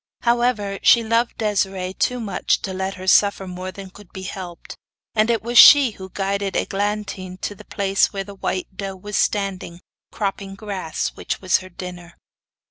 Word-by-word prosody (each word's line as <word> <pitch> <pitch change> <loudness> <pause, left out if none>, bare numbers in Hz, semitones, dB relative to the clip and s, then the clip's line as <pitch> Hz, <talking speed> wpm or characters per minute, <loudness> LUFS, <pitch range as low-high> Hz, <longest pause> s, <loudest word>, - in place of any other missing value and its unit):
However, 235 -5 +1
she 235 - +6
loved 230 +2 0
Desiree 195 -3 -1
too 250 +5 0
much 215 -4 -1
to 190 - -3
let 190 +1 -3
her 185 0 -8
suffer 200 +1 +4
more 185 +1 -6
than 190 0 -10
could 205 -1 -16
be 190 - -8
helped, 180 -2 -8 0.4
and 220 +1 +2
it 230 -2 +1
was 235 +1 +4
she 280 -4 +9
who 190 -2 -10
guided 195 +1 -2
Eglantine 200 -2 -3
to - - -3
the 200 - -15
place 195 -1 +1
where 195 -1 -3
the 200 +1 -10
white 190 -1 -4
doe 195 0 -5
was 205 +2 -7
standing, 190 -4 -1 0.3
cropping 195 -1 -3
the - - -19
grass 195 -6 -3
which - - -5
was 185 -1 +2
her 185 - -11
dinner. 175 -1 -9
195 Hz, 180 wpm, -21 LUFS, 185-210 Hz, 0.4 s, she